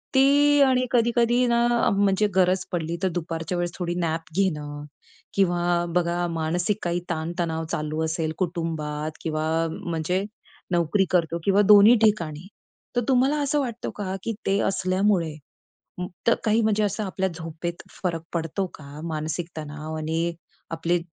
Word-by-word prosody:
ती 285 Hz, +2 st, +5 dB
आणि 255 Hz, -1 st, +2 dB
कधी-कधी 240 Hz, +1 st, +3 dB
ना 235 Hz, 0 st, +3 dB, 0.2 s
अ, -, -, +4 dB
म्हणजे 200 Hz, +1 st, +2 dB
गरज 185 Hz, 0 st, +3 dB
पडली 170 Hz, -1 st, -2 dB
तर 190 Hz, -, +3 dB
दुपारच्या 165 Hz, +1 st, -4 dB
वेळेस 175 Hz, 0 st, -1 dB
थोडी 175 Hz, -1 st, -2 dB
नॅप 165 Hz, -1 st, -2 dB
घेणं 150 Hz, -6 st, -1 dB, 0.5 s
किंवा 175 Hz, -2 st, +2 dB
बघा 175 Hz, 0 st, +1 dB
मानसिक 175 Hz, +5 st, 0 dB
काही 175 Hz, 0 st, 0 dB
ताण 165 Hz, 0 st, -2 dB
तणाव 165 Hz, -1 st, -1 dB
चालू 155 Hz, +1 st, -2 dB
असेल 160 Hz, -1 st, -2 dB
कुटुंबात 160 Hz, -4 st, -2 dB
किंवा 155 Hz, -1 st, -2 dB, 0.4 s
म्हणजे 175 Hz, +3 st, -1 dB, 0.5 s
नोकरी 175 Hz, +3 st, +2 dB
करतो 170 Hz, -2 st, +2 dB
किंवा 200 Hz, +1 st, +4 dB
दोन्ही 210 Hz, +3 st, +8 dB
ठिकाणी 175 Hz, -6 st, +1 dB, 0.5 s
तर 245 Hz, -, +3 dB
तुम्हाला 265 Hz, +3 st, +3 dB
असं 290 Hz, +1 st, +1 dB
वाटतं 245 Hz, -4 st, -3 dB
का 190 Hz, -2 st, -3 dB
की 230 Hz, -, -2 dB
ते 195 Hz, 0 st, +2 dB
असल्यामुळे 185 Hz, -3 st, +1 dB, 0.9 s
त -, -, +8 dB
अ, -, -, +5 dB
काही 220 Hz, +1 st, +3 dB
म्हणजे 215 Hz, -1 st, +2 dB
असं 205 Hz, +1 st, -1 dB
आपल्या 190 Hz, -1 st, -1 dB
झोपेत 165 Hz, +1 st, -6 dB, 0.2 s
फरक 165 Hz, -3 st, -1 dB
पडतो 170 Hz, +3 st, -1 dB
का? 140 Hz, 0 st, -11 dB
मानसिक 160 Hz, +1 st, -3 dB
तणाव 155 Hz, +1 st, -6 dB
आणि 165 Hz, +2 st, -1 dB, 0.4 s
आपले 170 Hz, +2 st, 0 dB
175 Hz, 150 wpm, -25 LUFS, 160-205 Hz, 0.9 s, दोन्ही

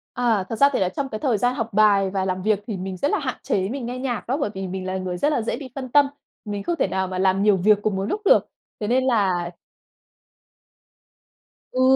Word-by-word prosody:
À, 230 Hz, -5 st, +2 dB
thật 225 Hz, -, -2 dB
ra 280 Hz, +5 st, +5 dB
thì -, -, +1 dB
là 185 Hz, -, +1 dB
trong 270 Hz, +8 st, -4 dB
cái 215 Hz, -, -5 dB
thời 245 Hz, -5 st, +1 dB
gian 245 Hz, +4 st, +1 dB
học 230 Hz, -3 st, -3 dB
bài 200 Hz, -2 st, +4 dB
và 190 Hz, 0 st, -1 dB
làm 185 Hz, 0 st, -2 dB
việc 210 Hz, 0 st, +2 dB
thì 215 Hz, -4 st, -3 dB
mình 185 Hz, 0 st, -5 dB
rất 285 Hz, -, 0 dB
là 420 Hz, -, +1 dB
hạn 265 Hz, -4 st, -3 dB
chế 190 Hz, 0 st, 0 dB
mình 260 Hz, 0 st, -4 dB
nghe 250 Hz, +1 st, -4 dB
nhạc 250 Hz, -4 st, -3 dB
đó, 260 Hz, +4 st, 0 dB
bởi 280 Hz, -, -1 dB
vì 190 Hz, 0 st, -4 dB
mình 185 Hz, 0 st, -5 dB
là 185 Hz, 0 st, -2 dB
người 185 Hz, -1 st, -4 dB
rất 295 Hz, +12 st, +1 dB
là 270 Hz, -, +1 dB
dễ 225 Hz, -, -2 dB
bị 270 Hz, -1 st, -8 dB
phân 260 Hz, -2 st, -5 dB
tâm. 285 Hz, +2 st, +5 dB, 0.4 s
Mình 205 Hz, -1 st, -4 dB
không 340 Hz, -, -1 dB
thể -, -, +2 dB
nào 190 Hz, 0 st, -1 dB
mà 185 Hz, 0 st, -4 dB
làm 190 Hz, +1 st, +2 dB
nhiều 205 Hz, -2 st, +4 dB
việc 210 Hz, +3 st, +4 dB
cùng 210 Hz, -1 st, 0 dB
một 190 Hz, -, -1 dB
lúc 415 Hz, -, -2 dB
được, -, -, +5 dB, 0.3 s
thế 210 Hz, -, -3 dB
nên 255 Hz, +3 st, +2 dB
là 190 Hz, -9 st, +1 dB, 2.2 s
Ừ, 255 Hz, -, 0 dB
210 Hz, 255 wpm, -23 LUFS, 190-255 Hz, 2.2 s, ra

